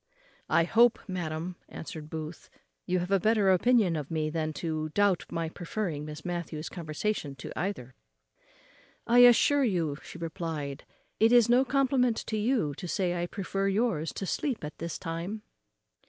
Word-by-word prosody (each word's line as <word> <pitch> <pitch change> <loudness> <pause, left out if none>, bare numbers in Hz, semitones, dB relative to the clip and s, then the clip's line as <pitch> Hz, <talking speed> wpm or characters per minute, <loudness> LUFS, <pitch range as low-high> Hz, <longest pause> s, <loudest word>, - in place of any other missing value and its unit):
"I 165 - +4
hope, 230 +7 +4
madam," 175 -1 -4
answered 155 -3 -8
Booth, 160 +1 -7 0.4
"you 185 0 +1
have 180 +2 -3
a 195 - +4
better 210 -1 +3
opinion 195 -2 +3
of 150 -3 -4
me 155 -1 -1
than 155 -1 -1
to 155 0 -3
doubt 200 -3 +3
my 165 -1 -2
preferring 165 -2 -4
Miss 150 0 -8
Matthews's 170 -3 -4
conversation 155 -2 -3
to 130 - -8
either." 155 -9 -3 1.1
"I 240 +1 +5
assure 245 +4 +6
you," 170 - 0 0.2
replied 160 -4 -5 0.3
she, 220 - +5
"it - - 0
is 240 -2 +6
no 245 +2 +5
compliment 260 -3 +2
to 220 - -2
you 215 - +1
to 180 - -6
say 180 0 0
I 175 - -1
prefer 195 +1 -2
yours 195 -6 0
to 195 - -4
sleep 255 - -2
at 150 0 -7
this 170 0 -4
time." 170 +6 -5
175 Hz, 160 wpm, -29 LUFS, 155-215 Hz, 1.1 s, assure